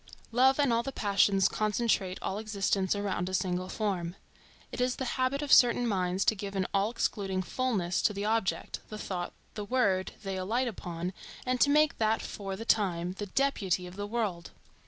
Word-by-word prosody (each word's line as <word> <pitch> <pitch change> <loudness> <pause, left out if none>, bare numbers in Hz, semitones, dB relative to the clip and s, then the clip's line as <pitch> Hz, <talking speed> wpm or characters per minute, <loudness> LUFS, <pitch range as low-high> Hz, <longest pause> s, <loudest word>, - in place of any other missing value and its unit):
Love 260 +3 +4
and 280 -5 +3
all 230 - +3
the 270 - -4
passions 200 -4 +3
concentrate 210 -3 0
all 195 - -2
existence 200 -3 0
around 200 -3 -2
a 190 - -1
single 185 -1 -1
form. 185 -5 -2 0.6
It - - -4
is 250 0 +1
the 260 - -3
habit 265 +2 0
of 290 - +3
certain 245 0 +6
minds 185 -3 0
to 220 - +4
give 200 0 -6
an 190 -1 +1
all 200 +1 +2
excluding 195 -5 -1
fulness 195 -6 -1
to - - +3
the 200 +1 -3
object, 220 -2 -1
the 215 - -6
thought, 180 -4 -4 0.2
the 210 - -5
word, 200 -5 +1
they 195 -1 -3
alight 225 +8 0
upon, 180 -4 -4 0.3
and 255 -1 0
to 285 - +6
make 300 +1 +3
that 220 0 +2
for 195 -2 -5
the 225 +4 -7
time 180 -6 +1
the 205 - -3
deputy 195 -7 0
of 180 0 -9
the 205 +1 -4
world. 205 -6 -2
205 Hz, 190 wpm, -30 LUFS, 185-235 Hz, 0.6 s, certain